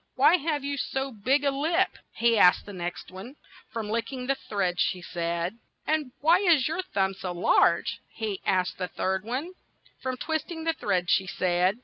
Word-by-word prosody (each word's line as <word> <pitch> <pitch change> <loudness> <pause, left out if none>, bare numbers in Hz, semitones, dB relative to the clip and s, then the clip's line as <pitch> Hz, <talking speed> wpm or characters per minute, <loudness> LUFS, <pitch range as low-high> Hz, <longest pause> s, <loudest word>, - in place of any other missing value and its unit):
'Why 295 +7 +6
have 300 -3 -2
you 280 0 -2
so 270 0 -2
big 260 +6 +1
a 280 - +3
lip?" 320 +7 +1 0.2
he 235 0 +3
asked 180 -4 +5
the 205 - -9
next 175 -1 -5
one. 195 +9 -9 0.3
"From 225 -2 -4
lick 225 +2 -2
ing 255 -2 -5
the 275 - +2
thread," 195 -9 -2
she 185 - +1
said. 170 +4 -3
' - - -48
'And 305 -4 0
why 330 +4 +5
is 340 -9 +4
your 325 +4 -1
thumb 195 - -1
so 185 -1 -5
large? 175 - +3
" - - -42
he 210 -4 -3
asked 185 -1 0
the 180 - -1
third 190 +1 -2
one. 260 - -3 0.5
"From 260 -1 -3
twist 315 +3 -2
ing 325 -2 -6
the 325 0 +1
thread," 180 - -1
she 190 - +3
said. 180 +2 +1
235 Hz, 205 wpm, -27 LUFS, 185-290 Hz, 0.5 s, Why